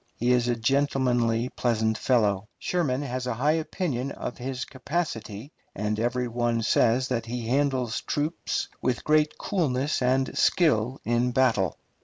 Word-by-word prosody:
He 120 +2 +1
is 120 -1 +3
a 120 - +2
gentlemanly, 125 -2 +1
pleasant 110 -3 0
fellow.... 105 -4 +1
Sherman 145 -7 -1
has 130 -2 -3
a 125 - -1
high 140 +6 +2
opinion 155 -5 -2
of 120 - -6
his 130 +1 -4
capacity, 130 - -4 0.2
and 105 +1 -2
every 125 +2 0
one 120 -1 0
says 120 +3 +3
that 115 -2 -2
he 120 -1 -4
handles 130 -3 +1
troops 150 +3 -2
with 125 -1 -1
great 155 0 +2
coolness 145 -8 0
and 130 +1 +1
skill 135 - +2
in 120 +2 +2
battle. 105 -10 +2
125 Hz, 145 wpm, -26 LUFS, 115-135 Hz, 0.2 s, is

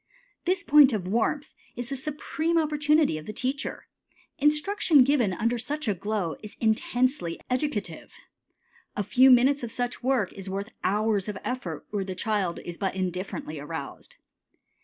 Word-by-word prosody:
This 360 -1 +1
point 290 -4 +7
of 190 -4 -2
warmth 235 +8 0 0.2
is 240 -1 -5
the 275 - -2
supreme 310 +4 -2
opportunity 300 - +2
of 155 - -12
the - - -3
teacher. 265 +5 -3 0.5
Instruction 300 0 +4
given 250 -7 +2
under 230 +6 0
such 290 +4 -3
a 210 - +3
glow 195 -2 -2
is 210 - -10
intensely 230 - 0
educative. 250 - -2 0.8
A 205 - -1
few 255 +6 +5
minutes 265 +3 +5
of 235 -2 -5
such 245 0 -3
work 250 -7 +1
is 195 -1 -7
worth 200 +3 -4
hours 210 0 +1
of 205 - -4
effort 195 -11 -4
where 205 -2 -1
the 190 -1 -5
child 195 -3 -1
is 170 -1 -7
but 195 -2 -1
indifferently 180 -4 -4
aroused. 145 0 -7
230 Hz, 155 wpm, -27 LUFS, 195-285 Hz, 0.8 s, point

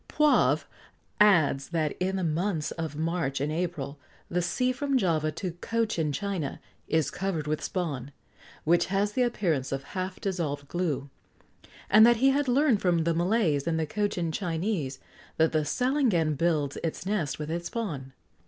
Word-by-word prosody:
Poivre 300 -1 +3 0.5
adds 160 -10 +4
that, 160 -3 -1
in 190 +1 0
the 190 - -1
months 160 -1 -1
of 160 -3 -4
March 160 -3 -1
and 145 +2 -1
April, 155 -4 -3 0.3
the 180 +1 0
sea 250 +8 +1
from 275 +1 0
Java 160 -8 +1
to 180 +3 -4
Cochin 220 -10 0
China 185 -4 -3 0.3
is 160 -2 +1
covered 185 -5 -2
with 150 0 -2
spawn, 145 -8 -3 0.5
which 175 +2 +3
has 200 +2 +1
the 255 - 0
appearance 175 - 0
of 135 0 -2
half 185 0 -3
dissolved 155 -7 -3
glue, 150 -5 -2 0.8
and 215 +2 +7
that 235 0 +6
he 265 +4 +4
had 285 +1 +1
learned 255 -3 +3
from 175 -3 +2
the 170 +1 +1
Malays 170 -4 +1
and 165 -1 +1
the 160 - 0
Cochin 180 -2 -1
Chinese 165 -5 -2 0.4
that 160 0 +3
the 155 -1 +1
salangan 220 - +1
builds 150 -3 0
its 165 +2 -3
nest 190 -7 -1
with 150 0 -5
this 170 +1 -3
spawn. 150 - -4
170 Hz, 160 wpm, -28 LUFS, 155-205 Hz, 0.8 s, and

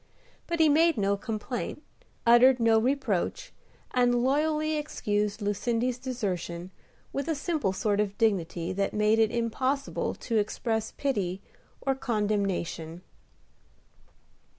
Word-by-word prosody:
But 340 -1 -2
he 320 - +6
made 320 +1 +4
no 200 -1 +2
complaint, 225 +7 -4 0.4
uttered 245 +2 +6
no 225 -1 +4
reproach, 265 - -1 0.4
and 245 -1 +3
loyally 305 +3 +1
excused 210 -8 -2
Lucindy's 235 +4 0
desertion 185 -8 -4 0.4
with 275 - -2
a 325 - 0
simple 295 - -1
sort 205 +2 0
of 205 -1 -1
dignity 180 -5 0
that 195 +2 -1
made 215 +1 +3
it 220 -1 +4
impossible 255 +4 -1
to 230 - -2
express 220 +1 -1
pity 195 -10 -2 0.4
or 270 - +1
condemnation. 200 -8 -2
225 Hz, 115 wpm, -28 LUFS, 200-270 Hz, 0.4 s, he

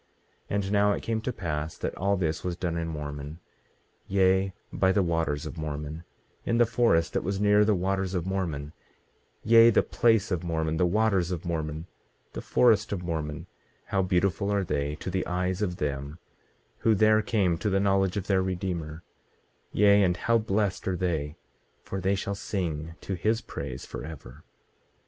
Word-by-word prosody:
18:30 - - -1
And 100 -1 -1
now 105 0 +4
it - - -4
came 110 -1 -1
to 125 - -2
pass 80 -7 -4
that - - -3
all 100 +1 0
this 80 -4 -1
was 90 -1 -2
done 85 -1 -2
in 85 0 -2
Mormon, 75 0 -6 0.7
yea, 95 0 +3 0.2
by 95 - +3
the 100 0 +2
waters 80 -4 -1
of 85 - -7
Mormon, 75 +1 -5 0.4
in 115 - 0
the 120 - +5
forest 85 -10 +2
that - - +1
was 95 +2 -2
near 105 0 +5
the 105 0 +3
waters 95 +1 -1
of 90 -2 -1
Mormon; 85 -6 -3 0.7
yea, 115 +1 +7
the 115 - +4
place 115 -3 +2
of 90 -2 -1
Mormon, 80 -2 -1
the 90 - +3
waters 100 -2 +2
of 90 -1 -4
Mormon, 80 -2 -3 0.5
the - - -5
forest 110 -4 +3
of 95 -3 -3
Mormon, 75 -3 -4 0.4
how 100 -1 0
beautiful 95 +2 +1
are 100 -1 +1
they 75 -3 -2
to 90 - -6
the 95 +1 0
eyes 90 +2 -1
of 90 -4 -1
them 70 -1 -3 0.6
who 110 -1 +3
there 110 +1 +4
came 100 -5 +1
to 105 - 0
the 95 0 +2
knowledge 95 -1 +2
of 100 - -2
their 95 -2 +2
Redeemer; 90 -4 -3 0.7
yea, 100 0 +5
and 90 -2 +2
how 115 +5 +2
blessed 105 -3 -1
are 95 -1 0
they, 80 -4 -2 0.5
for 95 - -5
they 95 +2 +2
shall 100 +1 -3
sing 85 -6 -4
to 100 - -4
his 110 +5 +1
praise 65 - -7
forever. 75 -2 -9
95 Hz, 180 wpm, -27 LUFS, 80-100 Hz, 0.7 s, yea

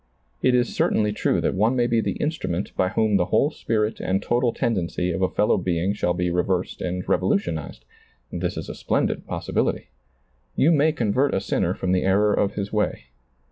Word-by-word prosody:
It 130 -1 +3
is 120 0 +1
certainly 105 -1 +2
true 105 - 0
that - - 0
one 110 +6 +2
may 120 -1 +2
be 115 -1 +2
the - - -1
instrument 150 - -3
by 95 - +1
whom 110 0 +2
the 90 - +1
whole 145 - +2
spirit 110 -5 -1
and 95 +1 0
total 120 +3 +1
tendency 90 -6 -1
of 95 - -3
a 95 - +2
fellow 105 - +2
being 90 +2 0
shall 90 -4 -1
be 90 -1 -1
reversed 90 +1 -1
and 90 0 -3
revolutionized; 210 -1 -1 0.5
this - - -3
is - - -5
a - - -5
splendid - - -1
possibility. - - -2 0.7
You - - +4
may 155 0 +4
convert 130 +1 +1
a - - +2
sinner 95 -2 -1
from 90 - -2
the 90 -1 +2
error 105 +2 +3
of 100 0 0
his 100 0 -4
way. 105 -12 -1
105 Hz, 190 wpm, -23 LUFS, 90-120 Hz, 0.7 s, You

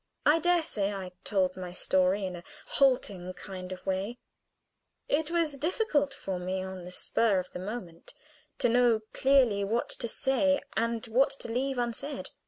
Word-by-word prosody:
I 305 +3 +5
dare 350 0 +3
say 205 -10 0
I 190 -2 -5
told 185 -3 +1
my 180 -1 -6
story 185 +2 +2
in 185 -1 -4
a 175 - -9 0.2
halting 205 -10 +2
kind 185 0 -8
of 185 - -8
way; 195 +5 -2 0.9
it 300 +2 +1
was 330 -4 0
difficult 300 - +1
for 190 -8 -4
me 185 +1 -2
on 190 -1 -7
the 180 - -8
spur 210 +2 +2
of 185 0 -3
the - - -6
moment 185 -4 -7 0.4
to 245 - +3
know 235 -2 +4
clearly 255 -7 +4
what 225 +4 -1
to 235 - -2
say 270 +4 +2 0.2
and 230 +1 0
what 245 +4 +3
to - - -4
leave 260 +3 -1
unsaid. 245 +4 -2
225 Hz, 170 wpm, -29 LUFS, 185-270 Hz, 0.9 s, I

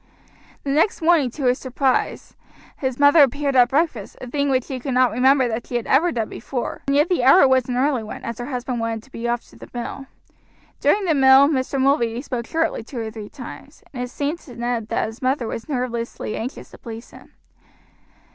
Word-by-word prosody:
The 275 - -2
next 310 +8 +2
morning, 320 -6 +4
to 270 +3 -5
his 250 0 +2
surprise, 260 0 -1 0.4
his 260 -2 -2
mother 290 +2 +6
appeared 280 0 +2
at 245 -1 +6
breakfast, 275 -8 -1
a - - -7
thing 280 +3 -1
which 260 -2 +1
he 260 -2 -4
could 260 0 -3
not 255 -2 +4
remember 260 +3 +3
that 225 0 -4
she 245 - -6
had 240 - -1
ever 330 +6 +3
done 225 -7 -2
before, 245 +1 -5
and 275 - +2
yet 295 +3 +4
the 350 -9 0
hour 275 +3 +7
was 260 -1 +2
an 245 - -1
early 265 -1 +1
one, 215 - -8
as 235 0 -5
her 240 - -5
husband 250 -2 -3
wanted 225 -1 -3
to 270 - -21
be 235 -1 -4
off 240 0 -2
to - - -17
the - - -12
mill. 245 +3 -5 0.7
During 405 -1 +2
the 330 - +2
meal 270 0 +7
Mr. 270 -2 -1
Mulready 250 -3 +1
spoke 245 -5 -4
sharply 325 -7 -1
two 245 +3 -10
or 225 -1 -4
three 215 -2 -8
times, 280 +2 -11
and 245 - -5
it 250 - -4
seemed 290 +6 -3
to 255 -8 -13
Ned 240 -2 -2
that - - 0
his 220 +1 -8
mother 260 -1 0
was 230 +5 -6
nervously 240 -5 -3
anxious 245 +5 -6
to - - -14
please 230 0 -9
him. - - -16
255 Hz, 220 wpm, -22 LUFS, 235-280 Hz, 0.7 s, hour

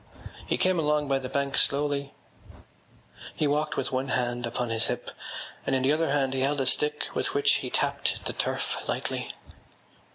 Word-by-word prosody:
He - - +1
came 185 -2 +3
along 150 -1 +2
by 135 -1 +2
the 130 -1 -5
bank 140 0 0
slowly. 140 0 +2 1.2
He 155 - +1
walked 150 +1 +1
with 130 - -1
one 130 +1 0
hand 120 -2 0
upon 120 +1 -2
his 115 0 +2
hip - - -3 0.5
and 135 - +1
in 130 - +1
the 135 +3 +4
other 160 0 +1
hand 135 -2 +2
he 135 - 0
held 140 +2 +1
a 135 - +1
stick 150 +3 +1
with - - 0
which 145 0 +4
he 125 - -4
tapped - - 0
the - - -1
turf - - -1
lightly. - - -2
140 Hz, 185 wpm, -28 LUFS, 130-150 Hz, 1.2 s, the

